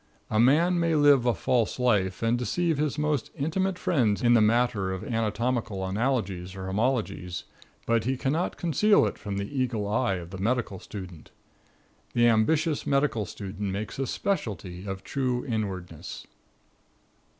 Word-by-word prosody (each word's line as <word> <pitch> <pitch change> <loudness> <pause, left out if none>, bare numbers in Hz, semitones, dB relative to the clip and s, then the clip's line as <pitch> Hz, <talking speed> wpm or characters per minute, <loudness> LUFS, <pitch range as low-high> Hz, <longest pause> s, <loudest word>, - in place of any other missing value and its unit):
A 110 - +2
man 165 +9 +4
may 165 -1 +2
live 145 -4 +5
a 120 - +4
false 120 0 0
life 105 -6 +1
and 115 +1 +3
deceive 160 +5 0
his 150 -1 0
most 150 -4 0
intimate 180 +6 -1
friends 120 - +1
in 120 0 +5
the 115 - +6
matter 110 -3 +2
of 95 -1 -4
anatomical 115 -2 -1
analogies 100 -4 -1
or 95 -1 -6
homologies, 100 -4 -1 0.4
but 115 -1 +2
he 130 +1 0
cannot 150 +7 -1
conceal 200 +6 +3
it - - -3
from 100 -3 -4
the 100 +8 -4
eagle 120 -6 -1
eye 105 -1 +1
of 85 -1 -7
the 95 - -7
medical 110 -2 -1
student. 90 -6 -9 0.8
The 120 0 +4
ambitious 145 +8 +2
medical 140 -7 +1
student 100 0 -5
makes 105 +6 -5
a 135 - -1
specialty 100 - -3
of 95 0 -5
true 130 -3 -1
inwardness. 95 - -4
115 Hz, 150 wpm, -27 LUFS, 100-135 Hz, 0.8 s, the